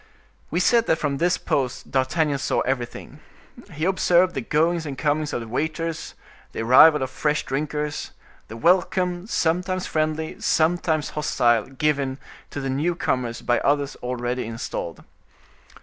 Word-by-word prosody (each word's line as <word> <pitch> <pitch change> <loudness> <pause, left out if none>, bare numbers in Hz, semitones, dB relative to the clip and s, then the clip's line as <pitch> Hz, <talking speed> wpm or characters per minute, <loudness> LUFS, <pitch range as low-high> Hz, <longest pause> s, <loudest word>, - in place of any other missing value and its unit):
We 170 - 0
said 235 +5 +3
that - - +4
from 145 -3 -1
this 175 +1 +2
post 130 -3 -2
D'Artagnan 140 +2 +1
saw - - 0
everything. 130 +2 -4 0.5
He 155 +2 -2
observed 180 -1 +3
the 135 - -2
goings 160 +6 +1
and 135 -2 -5
comings 150 +1 0
of - - -2
the 115 - -7
waiters; 160 +6 -3 0.4
the - - -3
arrival 145 +5 +7
of 130 - -4
fresh 150 +2 -1
drinkers; 150 +2 -3 0.4
the 110 - -9
welcome, 180 - +1
sometimes 180 0 0
friendly, 155 0 -2
sometimes 160 -1 +1
hostile, 120 -7 +1
given 135 -1 -1 0.3
to - - -5
the 135 -1 -3
newcomers 130 -5 -1
by 120 - +2
others 145 0 0
already 125 0 -3
installed. 115 -7 -5
150 Hz, 140 wpm, -23 LUFS, 130-165 Hz, 0.5 s, arrival